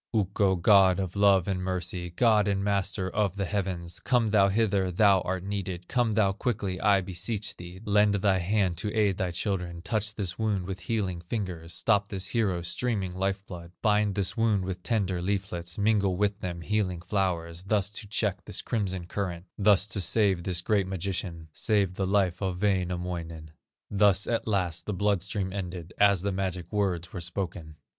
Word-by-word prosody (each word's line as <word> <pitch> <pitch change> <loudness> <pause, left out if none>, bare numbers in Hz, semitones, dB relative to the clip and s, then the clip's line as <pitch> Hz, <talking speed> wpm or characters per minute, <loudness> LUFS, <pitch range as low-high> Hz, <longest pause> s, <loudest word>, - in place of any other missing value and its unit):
"Ukko, 100 -1 +2
God 95 0 +5
of 95 -1 -3
love 100 -3 +4
and 95 -2 -1
mercy, 90 -1 -3
God 105 +3 +3
and 100 -1 0
Master 100 -1 0
of 100 -1 0
the 100 -1 -1
heavens, 90 -3 -3
Come 115 0 +1
thou 100 -2 +5
hither, 100 -2 +1
thou 100 0 +4
art 90 0 -3
needed, 95 -3 -4
Come 120 -4 +1
thou 105 -3 +3
quickly 100 -3 -2
I 100 -2 +4
beseech 95 +4 -3
thee, 90 +1 -10
Lend 105 0 +4
thy 95 -1 +2
hand 95 -1 +1
to 105 - -2
aid 100 -3 +2
thy 95 - 0
children, 85 -1 -3
Touch 110 +1 -1
this 95 -3 -4
wound 105 -5 0
with 95 0 -5
healing 95 -2 -2
fingers, 85 -4 -4
Stop 100 +4 +2
this 95 -3 -2
hero's 95 -7 0
streaming 100 -5 -1
life 95 +1 -2
blood, 85 -2 -9
Bind 105 -2 +2
this 100 -3 0
wound 110 -5 +2
with 90 -1 -4
tender 95 -5 0
leaflets, 90 -3 -3
Mingle 100 -3 +2
with 105 +1 0
them 85 -3 -5
healing 95 -2 -1
flowers, 90 -4 -1
Thus 100 -1 +1
to 105 0 -7
check 100 - -1
this - - -5
crimson 95 -5 -2
current, 90 -2 -4
Thus 100 -2 +4
to 100 -1 -3
save 95 0 +3
this 90 -2 -1
great 100 0 +1
magician, 90 -3 -4
Save 100 -1 +1
the 95 0 -2
life 95 -2 +1
of 95 -2 -2
Wainamoinen." 90 -5 -2 0.4
Thus 100 -1 +4
at 115 -1 -1
last 90 -6 -1
the 105 - -1
blood 100 0 +1
stream 95 0 -3
ended, 90 -3 -5
As 100 -3 +4
the 100 - 0
magic 95 -2 -3
words 95 -4 -1
were 90 - -5
spoken. 85 -3 -4
95 Hz, 180 wpm, -28 LUFS, 90-105 Hz, 0.4 s, God